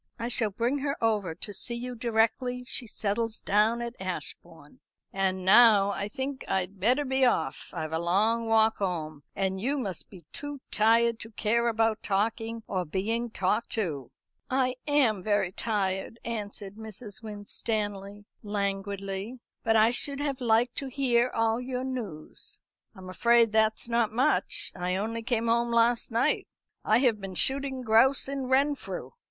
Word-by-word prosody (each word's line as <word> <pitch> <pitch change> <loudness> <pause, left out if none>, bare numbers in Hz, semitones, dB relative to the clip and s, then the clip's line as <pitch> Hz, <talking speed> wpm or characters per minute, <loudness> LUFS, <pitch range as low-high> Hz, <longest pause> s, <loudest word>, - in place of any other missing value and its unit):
"I 235 - -3
shall 220 -2 +1
bring 235 +7 -1
her 280 +1 -2
over 210 -7 0
to 205 +4 -3
see 235 +4 0
you 250 +1 -4
directly 240 +2 0
she 250 -1 -5
settles 220 +2 -2
down 220 +4 +2
at 235 0 -6
Ashbourne. 170 -4 -7 0.3
And 190 -1 -1
now 205 -1 +7
I 200 0 -3
think 265 +5 -4
I'd 190 +1 -1
better 250 +9 +2
be 265 0 +1
off; 160 - +1
I've 155 0 -4
a 160 - 0
long 215 +7 +1
walk 220 0 +4
home, 160 -6 -3
and 190 -1 -1
you 275 +6 0
must 195 - -3
be 180 -5 -14
too 290 -1 -6
tired 230 +1 +3
to 225 - -8
care 230 +2 +1
about 225 -1 +1
talking 225 +3 -1
or 185 -2 -2
being 220 +8 -2
talked 210 +2 0
to." 150 - -2 0.4
"I 255 -1 +1
am 260 -9 +3
very 205 -2 +1
tired," 195 0 -2
answered 205 -3 -5
Mrs. 220 -1 -8
Winstanley 205 -1 -4 0.2
languidly; 200 +2 -3 0.2
"but 225 0 +2
I 220 +1 +5
should 280 +3 -1
have 280 -2 -2
liked 235 +1 +2
to 275 - -3
hear 250 -2 +2
all 225 0 0
your 250 0 -3
news." 225 -13 -6 0.4
"I'm 190 -1 -11
afraid 235 +4 +4
that's 220 +1 +2
not 235 -2 +1
much. 260 +7 +1
I 180 0 -2
only 225 +4 -2
came 235 -1 -1
home 235 +1 +2
last 235 0 +3
night; 240 +6 +1 0.4
I 215 - +4
have 230 -6 +2
been 195 -1 -6
shooting 270 +3 0
grouse 245 +5 +4
in 275 -1 -3
Renfrew." 275 +2 0
225 Hz, 160 wpm, -28 LUFS, 200-240 Hz, 0.4 s, now